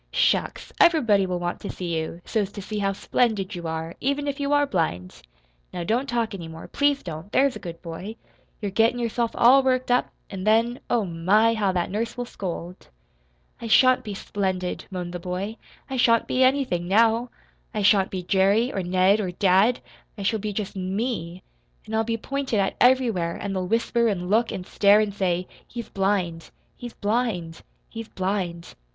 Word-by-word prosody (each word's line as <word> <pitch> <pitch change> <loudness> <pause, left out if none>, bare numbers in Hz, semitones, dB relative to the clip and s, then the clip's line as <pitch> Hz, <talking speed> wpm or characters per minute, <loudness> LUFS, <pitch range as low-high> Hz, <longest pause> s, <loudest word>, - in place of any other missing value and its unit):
"Shucks! - - 0
Everybody 225 - +4
will 180 -1 -1
want 175 0 -3
to - - -6
see 175 -2 -4
you, 160 +2 -4
so's 205 -3 -1
to 205 - -6
see 210 +1 -4
how 195 -1 +1
splendid 210 -1 0
you 170 -2 -5
are, 160 +1 -4
even 280 +2 -1
if 280 0 -3
you 280 0 -1
are 290 0 +4
blind. 160 - -2 0.5
Now 175 - -4
don't 240 +9 0
talk 235 -3 -1
any 175 -4 -6
more 160 0 -10
please 285 -1 +1
don't; 165 +3 -7
there's 275 -1 +3
a - - -6
good 170 -2 -9
boy. 180 +6 -7 0.4
You're 205 -3 -3
gettin' 225 +4 +3
yourself 235 0 -1
all 260 +3 +6
worked 255 -1 0
up, 245 - +2 0.2
an' 190 -2 -5
then, 230 +4 +2
oh, 230 -4 +1
my, 190 +7 +3
how 205 -4 +1
that 175 -1 -1
nurse 225 +4 -3
will 245 - -3
scold!" 180 -4 -7 0.7
"I 230 - -5
shan't 255 +3 +5
be 210 -3 -6
splendid," 190 -3 -3
moaned 180 -2 -5
the 175 - -4
boy. 185 +5 -4 0.3
"I 265 - -4
shan't 230 -2 +4
be 255 - +2
anything, 255 -10 +1
now. 225 +4 +3 0.4
I 215 -3 -2
shan't 195 -1 +4
be 185 -2 -4
Jerry 200 +6 +2
or 195 - -1
Ned 185 +3 +3
or 195 -4 -2
dad. 195 +6 +3 0.4
I 200 - -5
shall 220 +3 +1
be 210 +1 -3
just 205 -1 -4
ME. 185 -2 -3 0.4
And 220 - -4
I'll 220 - +2
be 230 0 -2
pointed 270 -1 -2
at 195 - 0
everywhere; 230 -10 +3
and 200 -1 -4
they'll 185 -1 -2
whisper 230 +2 +1
and 185 -3 -2
look 225 +2 +3
and 180 - -5
stare, 205 +2 +4
and 210 -2 0
say, 180 -2 -1 0.2
'He's 235 -1 -7
blind 190 -4 -1 0.3
he's 240 -1 -8
blind 205 -7 -2 0.3
he's 225 -1 -8
blind.' 185 -4 -3
205 Hz, 190 wpm, -24 LUFS, 180-235 Hz, 0.7 s, all